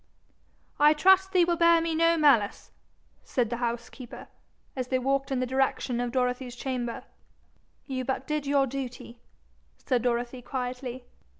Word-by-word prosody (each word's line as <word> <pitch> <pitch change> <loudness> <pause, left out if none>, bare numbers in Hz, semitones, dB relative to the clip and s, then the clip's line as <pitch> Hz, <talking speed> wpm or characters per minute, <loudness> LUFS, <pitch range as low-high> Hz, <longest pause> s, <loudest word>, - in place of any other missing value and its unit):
'I 295 +1 +6
trust 380 +4 +4
thee 365 -3 +4
will 345 0 0
bear 335 0 +5
me 330 0 -1
no 330 +1 +3
malice,' 275 -10 +2 0.5
said 245 -5 -1
the 240 - -1
housekeeper, 240 +1 -5 0.5
as 255 -2 -3
they 255 - +1
walked 275 +1 0
in 265 - 0
the 255 - 0
direction 260 -1 0
of 245 -1 -2
Dorothy's 250 -1 -1
chamber. 245 -2 -4 0.8
'You 260 -2 -3
did 265 +1 -3
but 300 -1 -2
your 280 -1 +3
duty,' 250 -2 -7 0.6
said 250 -3 0
Dorothy 245 +1 -2
quietly. 250 0 -5
260 Hz, 145 wpm, -27 LUFS, 245-290 Hz, 0.8 s, I